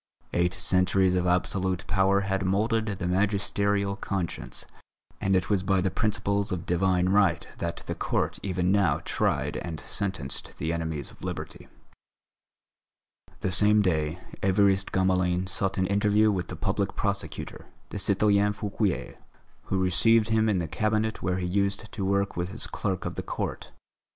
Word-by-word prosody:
Eight 90 +2 +1
centuries 95 0 +2
of 90 0 +1
absolute 90 +1 0
power 95 +1 +3
had 95 -1 -1
moulded 110 +4 +1
the 100 -4 -3
magisterial 100 +1 +1
conscience, 95 -4 -4 0.5
and 95 0 +1
it 95 - +1
was 100 -3 +2
by 95 0 +2
the 95 0 0
principles 100 -2 0
of 90 -2 -3
Divine 90 +1 +2
Right 95 -4 +3
that - - -4
the - - -3
Court - - -1
even 90 -2 0
now 95 -8 +2
tried - - 0
and 80 -3 -5
sentenced 95 -9 -4
the 80 +1 -2
enemies 80 -4 -3
of - - -17
Liberty. - - -6 1.7
The 95 - 0
same 105 +2 +5
day 80 -3 0 0.2
Évariste 95 0 +2
Gamelin 90 -1 +1
sought 95 +1 -2
an 95 - +2
interview 105 +2 +3
with 95 -3 -2
the - - -6
Public - - -1
Prosecutor, - - -3 0.2
the 105 - -5
citoyen 100 +1 +3
Fouquier, 105 -2 -2 0.5
who 95 - -1
received 105 +5 +4
him 110 0 +3
in 100 - +2
the 85 -2 -1
Cabinet 110 +5 0
where 90 -1 0
he 90 - -2
used 100 +3 -1
to 100 - -4
work 100 +1 0
with 90 +1 -2
his 110 +4 -3
clerk 95 -4 -3
of - - -3
the - - -4
court. - - -4
95 Hz, 155 wpm, -27 LUFS, 90-100 Hz, 1.7 s, same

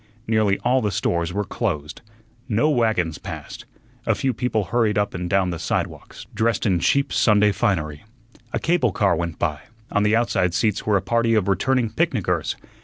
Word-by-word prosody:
Nearly 110 -3 +2
all 130 +2 +3
the 105 - 0
stores 85 -3 -1
were 100 +3 -1
closed. 75 -5 -3 0.5
No 120 +8 +2
wagons 110 - +1
passed. - - -8 0.4
A - - +3
few 130 -1 0
people 120 -3 -1
hurried 110 +2 +1
up 105 0 0
and 90 -1 -4
down 95 -1 +2
the 85 - -5
sidewalks, - - -4
dressed 115 -1 0
in 95 -5 +2
cheap 140 +10 +1
Sunday 105 -2 +4
finery. 80 -7 -1 0.5
A - - -1
cable 160 - +1
car 100 -3 +2
went 85 0 -3
by; 75 -1 -1 0.3
on 105 - +2
the 105 +1 +3
outside 95 -6 +1
seats 105 0 0
were 105 -2 +4
a - - -3
party 115 -1 +2
of 105 -3 +1
returning 115 +4 +1
picnickers. 110 - 0
105 Hz, 180 wpm, -22 LUFS, 90-115 Hz, 0.5 s, Sunday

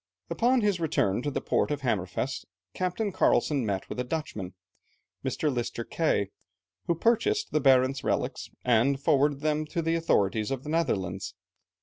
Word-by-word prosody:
Upon 250 +1 +3
his 205 -4 +1
return 130 - +1
to 145 - -1
the 140 - -3
port - - +1
of 145 -1 -2
Hammerfest, 110 +1 -2 0.3
Captain 185 +3 -1
Carlsen 145 -6 +2
met 100 -3 -2
with - - -6
a - - +1
Dutchman, 115 - -4 0.7
Mr. 150 -3 0
Lister 120 -1 -3
Kay, 110 -10 0 0.6
who 170 - +2
purchased 235 - +1
the 155 - +1
Barentz 130 0 +4
relics, - - -1 0.2
and 125 +3 +3
forwarded 140 -1 +2
them 155 0 +1
to 170 - -2
the 165 +1 +1
authorities 110 -10 +1
of 135 -1 -3
the 150 - -7
Netherlands. 95 - -1
140 Hz, 155 wpm, -28 LUFS, 115-165 Hz, 0.7 s, Barentz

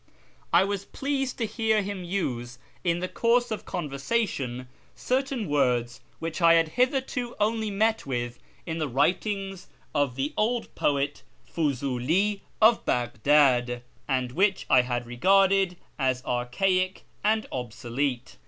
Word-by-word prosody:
I 170 +2 +6
was 200 0 -2
pleased 270 -1 -2
to 230 - 0
hear 220 -1 +1
him 195 -2 -5
use 125 -10 -3 0.3
in 175 -1 +1
the 185 - -1
course 240 +3 +2
of 220 - -4
conversation 140 - -2 0.3
certain 260 -4 -1
words 125 -4 +1 0.2
which 165 +1 -4
I 165 0 +7
had 165 -1 +3
hitherto 250 - 0
only 220 +1 +1
met 220 -1 +1
with 120 -2 -3 0.3
in 165 0 -3
the 155 - 0
writings 190 - -1 0.3
of 140 -4 +1
the 135 +3 -2
old 235 +2 0
poet 145 0 0 0.2
Fuziili 150 +7 0 0.2
of 225 +1 +5
Baghdad, 125 0 +2 0.2
and 130 -3 0
which 195 +6 +1
I 130 - +7
had 120 -1 -2
regarded 190 +8 +3 0.2
as 130 -1 0
archaic 185 +10 0 0.2
and 220 +1 +2
obsolete. 125 +1 -3
170 Hz, 130 wpm, -27 LUFS, 130-210 Hz, 0.3 s, I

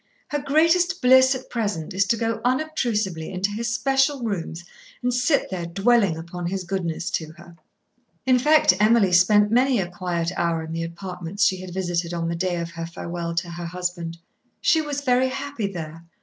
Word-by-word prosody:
Her 295 - -1
greatest 330 +6 +2
bliss 260 +1 +6
at 260 - -8
present 205 -10 -2
is 195 +1 +1
to 230 - +2
go 230 0 -2
unobtrusively 240 - -1
into 190 +2 -1
his 230 +3 -2
special 270 +2 +1
rooms 170 -6 -4 0.4
and 250 0 +1
sit 250 +2 +1
there 175 -3 -3
dwelling 195 -1 +2
upon 170 +1 -6
his 190 +1 -3
goodness 175 -3 -3
to 160 -1 -3
her." 170 0 -15 0.7
In 255 -1 +4
fact 300 -6 +5
Emily 215 -2 +4
spent 205 +4 +5
many 250 0 +3
a 185 - -1
quiet 175 -1 -2
hour 170 -1 0
in 160 0 -7
the 165 - -3
apartments 180 +3 -3
she 190 - +2
had 185 -1 -8
visited 175 -2 -2
on 165 -1 -2
the 170 - -2
day 180 +1 -1
of 170 0 -4
her 165 -1 -6
farewell 170 0 -5
to 170 0 -2
her 170 0 -6
husband. 175 -1 -4 0.4
She 320 -2 +3
was 290 -2 -3
very 260 -1 +2
happy 270 -4 -4
there. 165 -2 -7
190 Hz, 185 wpm, -23 LUFS, 170-250 Hz, 0.7 s, bliss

